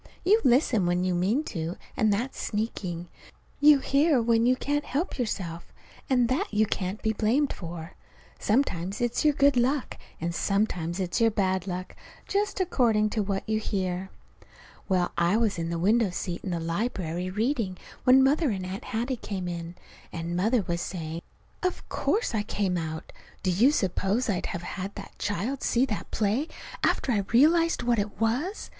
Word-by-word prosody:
You 425 Hz, +5 st, +5 dB
listen 240 Hz, -, +3 dB
when 175 Hz, +1 st, +1 dB
you 185 Hz, -1 st, +1 dB
mean 195 Hz, -, +1 dB
to, 165 Hz, 0 st, -3 dB, 0.2 s
and 215 Hz, -1 st, +3 dB
that's 235 Hz, +7 st, -2 dB
sneaking. 185 Hz, -5 st, -3 dB, 0.5 s
You 295 Hz, 0 st, +8 dB
hear 275 Hz, +1 st, +3 dB
when 230 Hz, 0 st, +3 dB
you 255 Hz, -, +4 dB
can't 290 Hz, +3 st, -1 dB
help 290 Hz, +3 st, -2 dB
yourself, 175 Hz, -8 st, -3 dB, 0.4 s
and 250 Hz, -3 st, +3 dB
that 285 Hz, -, -1 dB
you 215 Hz, +1 st, +3 dB
can't 195 Hz, 0 st, -3 dB
be 220 Hz, -1 st, +1 dB
blamed 240 Hz, +7 st, +1 dB
for. 170 Hz, -1 st, -7 dB, 0.5 s
Sometimes 200 Hz, -5 st, 0 dB
it's 240 Hz, -1 st, 0 dB
your 300 Hz, -2 st, +4 dB
good 280 Hz, -1 st, +4 dB
luck, 255 Hz, +3 st, 0 dB, 0.2 s
and 170 Hz, +1 st, -2 dB
sometimes 180 Hz, -3 st, 0 dB
it's 180 Hz, +2 st, -1 dB
your 225 Hz, -, +6 dB
bad 190 Hz, -3 st, 0 dB
luck 185 Hz, 0 st, -5 dB, 0.3 s
just 405 Hz, 0 st, 0 dB
according 230 Hz, -, +2 dB
to 215 Hz, -, 0 dB
what 195 Hz, -1 st, -2 dB
you 215 Hz, 0 st, +1 dB
hear! 190 Hz, -3 st, -2 dB, 0.8 s
Well, 180 Hz, -2 st, +2 dB
I 175 Hz, +5 st, +3 dB
was 220 Hz, -6 st, +1 dB
in 165 Hz, 0 st, -2 dB
the 170 Hz, -, -2 dB
window 210 Hz, +5 st, +3 dB
seat 175 Hz, -1 st, -4 dB
in 195 Hz, -, -4 dB
the 170 Hz, -2 st, -1 dB
library 175 Hz, 0 st, -2 dB
reading 215 Hz, -1 st, -1 dB, 0.3 s
when 260 Hz, +1 st, +7 dB
Mother 290 Hz, +3 st, +3 dB
and 190 Hz, -4 st, -2 dB
Aunt 190 Hz, +5 st, -6 dB
Hattie 245 Hz, +2 st, -2 dB
came 190 Hz, -5 st, -4 dB
in; 170 Hz, 0 st, -5 dB, 0.4 s
and 170 Hz, +1 st, -4 dB
Mother 220 Hz, +5 st, +2 dB
was 170 Hz, -1 st, -2 dB
saying: 165 Hz, -2 st, -5 dB, 0.4 s
"Of 365 Hz, -1 st, -2 dB
course 435 Hz, -, 0 dB
I 215 Hz, -, +1 dB
came 200 Hz, -3 st, -1 dB
out! 160 Hz, -2 st, -4 dB, 0.3 s
Do 185 Hz, -, +2 dB
you 220 Hz, +10 st, +5 dB
suppose 205 Hz, -, 0 dB
I'd 180 Hz, -, -2 dB
have 170 Hz, -, -5 dB
had 195 Hz, +2 st, -5 dB
that 200 Hz, -, -9 dB
child 210 Hz, +7 st, -2 dB
see 245 Hz, +2 st, +2 dB
that 220 Hz, -6 st, -4 dB
play, 220 Hz, +8 st, 0 dB, 0.4 s
after 260 Hz, -, +2 dB
I 215 Hz, -, +2 dB
realized 330 Hz, +7 st, +4 dB
what 240 Hz, -2 st, +2 dB
it 205 Hz, 0 st, -3 dB
was? 255 Hz, -, -1 dB
210 Hz, 175 wpm, -27 LUFS, 180-250 Hz, 0.8 s, You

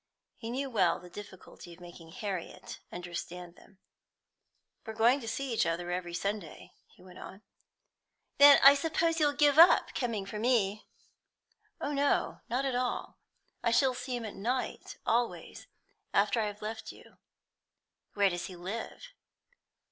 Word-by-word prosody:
He 225 Hz, -, -8 dB
knew 270 Hz, +3 st, -3 dB
well 190 Hz, -9 st, +1 dB
the 180 Hz, 0 st, -14 dB
difficulty 190 Hz, -3 st, -11 dB
of -, -, -22 dB
making 175 Hz, -2 st, -13 dB
Harriet 190 Hz, 0 st, -6 dB
understand 175 Hz, 0 st, -7 dB
them. 195 Hz, -, -21 dB, 1.1 s
"We 220 Hz, -, -7 dB
are -, -, -16 dB
going 235 Hz, +5 st, +4 dB
to 230 Hz, -, -8 dB
see 270 Hz, +2 st, -3 dB
each 215 Hz, -, +1 dB
other 175 Hz, +1 st, -2 dB
every 175 Hz, -1 st, -4 dB
Sunday," 200 Hz, -3 st, -5 dB
he -, -, -22 dB
went 185 Hz, -1 st, -14 dB
on. 195 Hz, +3 st, -11 dB, 1.0 s
"Then 285 Hz, 0 st, +9 dB
I 275 Hz, +1 st, +10 dB
suppose 325 Hz, +3 st, 0 dB
you'll 295 Hz, -2 st, +3 dB
give 290 Hz, +1 st, +3 dB
up 340 Hz, -, +6 dB
coming 230 Hz, -6 st, -2 dB
for 210 Hz, +2 st, -6 dB
me?" 215 Hz, -4 st, 0 dB, 0.9 s
"Oh 290 Hz, -, -3 dB
no, 285 Hz, 0 st, 0 dB
not 255 Hz, +3 st, -1 dB
at 270 Hz, -, -1 dB
all. 245 Hz, 0 st, -3 dB, 0.4 s
I 235 Hz, -, +1 dB
shall 260 Hz, +2 st, +3 dB
see 250 Hz, 0 st, -5 dB
him 235 Hz, -, -6 dB
at 210 Hz, -, -6 dB
night 245 Hz, +6 st, -4 dB
always, 235 Hz, +1 st, -2 dB, 0.5 s
after 235 Hz, -, +3 dB
I 215 Hz, -, -1 dB
have 205 Hz, +1 st, -8 dB
left 220 Hz, +1 st, -6 dB
you." -, -, -18 dB, 1.0 s
"Where 200 Hz, -2 st, +3 dB
does 175 Hz, 0 st, -4 dB
he 185 Hz, -, -10 dB
live?" 220 Hz, -, -7 dB
220 Hz, 155 wpm, -30 LUFS, 185-255 Hz, 1.1 s, I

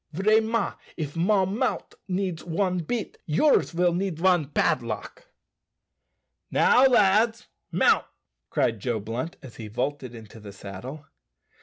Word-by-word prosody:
"Vraiment, 220 Hz, +4 st, +1 dB, 0.2 s
if 150 Hz, -3 st, -4 dB
mon 190 Hz, +3 st, +1 dB
mout' 260 Hz, -, -1 dB
needs 185 Hz, -3 st, -2 dB
one 180 Hz, +2 st, -1 dB
bit, 210 Hz, +7 st, -4 dB
yours 170 Hz, -, +3 dB
will 175 Hz, 0 st, +2 dB
need 180 Hz, -2 st, -2 dB
one 175 Hz, -5 st, +3 dB
padlock." 115 Hz, -7 st, -2 dB, 1.2 s
"Now, 260 Hz, +2 st, +5 dB
lads, 225 Hz, -1 st, +3 dB, 0.3 s
mount!" -, -, +3 dB, 0.4 s
cried 115 Hz, -2 st, 0 dB
Joe 115 Hz, +1 st, -2 dB
Blunt 115 Hz, +10 st, -5 dB
as 130 Hz, -3 st, -12 dB
he 110 Hz, -, -7 dB
vaulted 125 Hz, +3 st, -3 dB
into 110 Hz, 0 st, -12 dB
the 100 Hz, -2 st, -10 dB
saddle. 105 Hz, +10 st, -9 dB
170 Hz, 125 wpm, -26 LUFS, 120-200 Hz, 1.2 s, Now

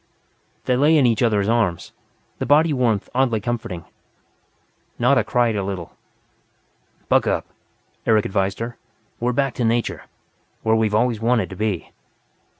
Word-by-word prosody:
They 125 Hz, -, +2 dB
lay 150 Hz, +5 st, +4 dB
in 140 Hz, -, +4 dB
each 115 Hz, -2 st, +2 dB
other's 105 Hz, -4 st, +2 dB
arms, 110 Hz, -7 st, 0 dB, 0.5 s
the -, -, -2 dB
body 150 Hz, +3 st, +4 dB
warmth 120 Hz, -6 st, 0 dB
oddly 125 Hz, -3 st, +2 dB
comforting. 105 Hz, -6 st, -4 dB, 1.1 s
Nada 125 Hz, +3 st, +3 dB
cried 120 Hz, -3 st, +1 dB
a 100 Hz, -, -1 dB
little. 95 Hz, -3 st, -6 dB, 1.1 s
"Buck -, -, +3 dB
up," -, -, 0 dB, 0.6 s
Eric 110 Hz, -2 st, +3 dB
advised 95 Hz, 0 st, -1 dB
her. 115 Hz, +1 st, -5 dB, 0.4 s
"We're 120 Hz, +1 st, 0 dB
back 135 Hz, +1 st, 0 dB
to 125 Hz, -, 0 dB
nature 115 Hz, -8 st, -1 dB, 0.6 s
where 110 Hz, 0 st, +3 dB
we've 110 Hz, -2 st, +1 dB
always 115 Hz, -1 st, +1 dB
wanted 115 Hz, -5 st, +1 dB
to -, -, -6 dB
be." 105 Hz, -3 st, -3 dB
115 Hz, 145 wpm, -21 LUFS, 105-125 Hz, 1.1 s, lay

